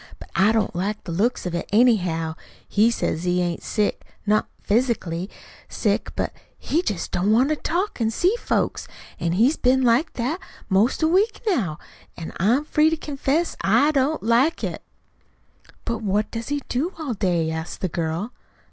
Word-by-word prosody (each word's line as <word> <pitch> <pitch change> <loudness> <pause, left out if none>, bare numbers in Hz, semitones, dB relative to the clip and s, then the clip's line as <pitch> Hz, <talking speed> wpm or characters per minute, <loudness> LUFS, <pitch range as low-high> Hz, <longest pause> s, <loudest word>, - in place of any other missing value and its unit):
"But - - -13
I 200 +3 +5
don't 220 -5 0
like 205 +4 -2
the 170 - -6
looks 210 +8 0
of 180 - -3
it, 175 - -3
anyhow. 180 -9 +3 0.3
He 215 +3 +4
says 175 -7 -1
he 180 0 +1
ain't 175 -1 -1
sick 210 -2 -1 0.2
not 215 +1 +2 0.2
physicianly 200 -6 0 0.4
sick; - - -1
but - - -2 0.2
he 325 - 0
jest 205 - -3
don't 190 +4 +1
want 250 +6 +4
to 310 - +2
talk 345 - -2
an' 220 - +2
see 355 - +2
folks. - - -1 0.3
An' 170 0 0
he's 240 - +3
been 260 +1 +3
like 245 +6 +3
that 260 +9 -2 0.3
'most 215 +10 +2
a - - +5
week 395 +7 +2
now. 220 - 0 0.4
An' 165 - -7
I'm 240 - +2
free 305 +1 +3
to 320 - -1
confess 295 +2 -1
I 295 +2 +4
don't 290 +2 +1
like 240 +8 +2
it." - - -3 1.0
"But 230 0 -2
what 210 +1 0
does 230 -1 -5
he 290 -1 -2
do 305 +10 -1
all 305 -6 -3
day?" 175 -6 0
asked 160 +1 -5
the 185 - +1
girl. 170 +6 -3
230 Hz, 175 wpm, -23 LUFS, 185-285 Hz, 1.0 s, I